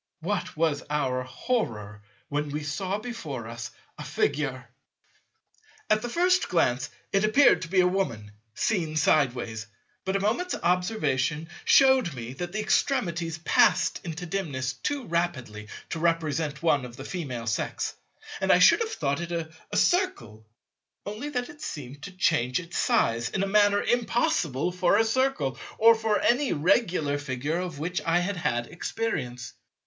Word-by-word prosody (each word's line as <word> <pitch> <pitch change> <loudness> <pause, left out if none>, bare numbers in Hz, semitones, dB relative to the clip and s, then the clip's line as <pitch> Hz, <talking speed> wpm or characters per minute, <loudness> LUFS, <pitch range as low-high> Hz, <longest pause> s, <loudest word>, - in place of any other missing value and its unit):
What 195 -1 -3
was 155 -3 +1
our 130 -4 0
horror 115 - -3 0.3
when 145 0 -2
we 150 +1 -4
saw 185 +7 -2
before 160 - -6
us 115 +1 -6 0.3
a - - -5
Figure! 135 -4 -1 1.2
At 215 0 +4
the 240 - -4
first 360 +6 +2
glance 130 -7 +1 0.2
it 195 0 +3
appeared 255 +7 +5
to 175 - -4
be 185 +2 +3
a 180 - +4
Woman, 120 - -2 0.2
seen 165 - 0
sideways; 120 -8 +1 0.4
but 190 0 -2
a - - +2
moment's 230 - 0
observation 165 - 0 0.2
shewed 265 - +5
me 120 0 -6
that 175 +6 -5
the 215 - -3
extremities 175 - 0
passed 160 - +3
into 170 +1 -5
dimness 145 -9 -2
too 270 - -3
rapidly 130 - -2 0.2
to 165 - -2
represent 160 -2 0
one 145 -5 +3
of 120 -1 -9
the 135 - -8
Female 135 -11 -4
Sex; 115 +1 -2 0.5
and - - +2
I - - +7
should - - +6
have 455 -1 -2
thought 140 +1 -1
it 170 0 -5
a 165 -1 -5
Circle, 115 - 0 0.6
only 215 +8 -5
that 245 -4 -2
it 300 0 -13
seemed 140 - -7
to - - -7
change 160 -9 +1
its 170 -1 -9
size 115 +1 +2
in 195 - -1
a - - 0
manner 205 0 +4
impossible 180 - +1
for 180 +2 +2
a 225 - +4
Circle 220 - 0 0.2
or 230 +1 +7
for 220 -2 0
any 255 +3 +2
regular 160 -3 +1
Figure 145 +3 -2
of 180 -4 -4
which 170 +5 -2
I 165 +1 +2
had 180 +2 -1
had 120 -7 -1
experience. 130 - -4
165 Hz, 155 wpm, -27 LUFS, 135-205 Hz, 1.2 s, I